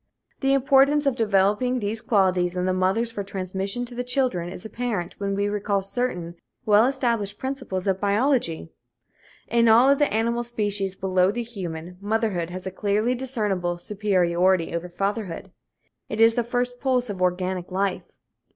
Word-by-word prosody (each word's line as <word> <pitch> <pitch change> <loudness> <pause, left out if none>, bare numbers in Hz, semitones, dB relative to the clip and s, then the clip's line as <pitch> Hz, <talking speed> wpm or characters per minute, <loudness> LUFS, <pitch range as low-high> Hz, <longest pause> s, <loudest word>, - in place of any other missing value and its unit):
The 270 0 +2
importance 275 +2 +4
of 275 -3 +2
developing 210 +3 +2
these 220 -1 -2
qualities 185 -4 +1
in 180 - 0
the 185 - +1
mothers 190 +6 +1
for 205 -3 -4
transmission 195 +4 -3
to 245 - -3
the 245 +1 -3
children 250 -9 0
is 180 - -7
apparent 220 -5 -4
when 200 -1 -1
we 200 +1 0
recall 205 -1 -1
certain 190 -5 -3 0.3
well 215 +2 +5
established 235 -7 -1
principles 255 -9 -4
of 190 -1 0
biology. 205 - +1 0.8
In 235 0 +3
all 235 +4 +6
of 280 - +2
the 290 - +2
animal 235 +2 0
species 205 -5 -2
below 185 -1 +2
the 235 +4 -2
human, 180 -6 -7
motherhood 205 -5 -1
has 185 +1 -7
a 190 - -3
clearly 210 +5 0
discernible 210 -9 -2
superiority 185 -3 +1
over 170 +1 -3
fatherhood. 195 0 -3 0.6
It 215 - -4
is 225 0 +6
the 240 - 0
first 245 +1 -2
pulse 255 -2 +1
of 195 -4 -5
organic 180 0 -1
life. 190 0 -2
205 Hz, 160 wpm, -24 LUFS, 185-240 Hz, 0.8 s, all